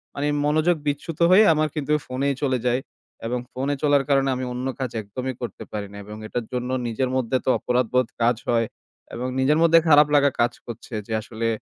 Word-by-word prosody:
মানে, 145 +1 -1 0.2
মনোযোগ 155 +4 +3
বিচ্যুত 145 +2 -3
হয়ে 195 +4 +8
আমার 155 0 +1
কিন্তু 150 -1 -2
phone-ই 135 +2 -1
চলে 130 -2 +1
যায়। 125 +2 +1 0.5
এবং 125 +2 -1
phone-এ 135 +3 -2
চলার 145 -2 +4
কারণে 135 -1 +3
আমি 130 0 -3
অন্য 125 +1 -3
কাজ 130 -3 -2
একদমই 125 +6 -5
করতে 120 -5 -6
পারি 105 -1 -4
না। 100 - -10
এবং 105 +1 -8
এটার 120 +1 -3
জন্য 125 0 -2 0.2
নিজের 120 +3 -1
মধ্যে 130 0 +1
তো - - +1
অপরাধবোধ 125 0 +1
কাজ 120 +1 +3
হয়। 115 -1 +2 0.5
এবং 125 +2 -3
নিজের 140 +4 +3
মধ্যে 165 0 +6
খারাপ 150 -1 +7
লাগা 140 -1 +4
কাজ 120 0 +3
করছে 120 0 -9
যে, 110 - -4
আসলে 115 +1 -4
130 Hz, 195 wpm, -23 LUFS, 120-145 Hz, 0.5 s, হয়ে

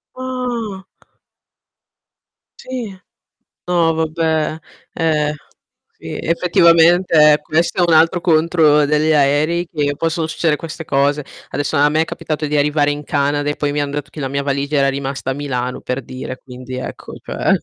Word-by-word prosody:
Ah. 245 -6 -4 1.7
Sì. 245 -6 -6 0.7
No, 170 -2 +2
vabbè, 160 -1 -1 0.4
eh. 150 -2 0 0.6
Sì - - -7
effettivamente 170 -2 +4
questo 165 +5 0
è 175 - +2
un - - +5
altro 165 +2 +3
contro 155 -3 +3
degli 150 +2 +2
aerei, 150 +5 +2
che 145 -4 -2
possono 165 0 -1
succedere 160 -1 0
queste 165 0 -7
cose. 145 +1 +1 0.2
Adesso 145 +2 -2
a 145 +1 +5
me 155 +1 +2
è - - 0
capitato 155 -1 -4
di 150 - -3
arrivare 145 0 +2
in 145 0 -3
Canada 145 +1 0
e 145 - -1
poi 145 -1 -1
mi 145 - -1
han 145 -1 -2
detto 145 -1 -5
che 155 - -9
la 135 - -2
mia 140 +1 -2
valigia 140 +1 -1
era 140 0 +3
rimasta 135 -1 -3
a - - +1
Milano 125 -3 -3
per 125 +2 -4
dire, 130 +1 -7
quindi 130 0 -8
ecco, 130 - -7
cioè - - 0
150 Hz, 155 wpm, -18 LUFS, 145-165 Hz, 1.7 s, un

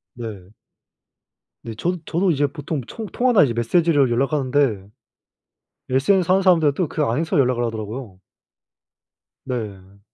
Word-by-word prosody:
네. 105 -6 -8 1.1
네 115 - -6
저도 175 +10 -1
저도 175 +2 +1
이제 145 -1 +1
보통 145 -1 -5
총 225 - -7
통화나 245 -8 +3
이제 125 - 0
메시지로 140 +3 +2
연락하는데 135 -5 0 1.0
SNS 175 +8 +2
하는 190 - +4
사람들은 165 -6 +4
또 175 0 -1
그 155 - -2
안에서 145 +6 0
연락을 125 -2 +2
하더라고요. 110 -2 -6 1.2
네. 100 -5 -6
135 Hz, 285 characters per minute, -21 LUFS, 115-165 Hz, 1.2 s, 하는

